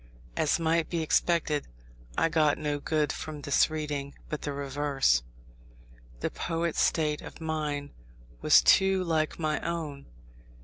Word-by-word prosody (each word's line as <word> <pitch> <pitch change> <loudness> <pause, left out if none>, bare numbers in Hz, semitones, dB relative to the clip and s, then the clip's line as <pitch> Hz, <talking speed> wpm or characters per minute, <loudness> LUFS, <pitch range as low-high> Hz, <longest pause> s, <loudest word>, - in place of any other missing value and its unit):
As 155 - +1
might 165 0 +1
be 170 -2 -1
expected, 155 -2 +1 0.5
I - - +3
got 155 -2 +2
no 150 -1 -2
good 150 0 0
from 150 -2 -6
this 140 +2 +3
reading, 150 -3 -4
but 150 - -4
the 145 - -3
reverse. 140 - +1 1.0
The - - -1
poet's 165 -1 -1
state 150 -2 +1
of - - -10
mind 150 -3 -3 0.5
was - - +6
too 190 -1 +4
like 160 -3 0
my 155 -2 0
own. 160 -5 -4
155 Hz, 135 wpm, -28 LUFS, 145-165 Hz, 1.0 s, was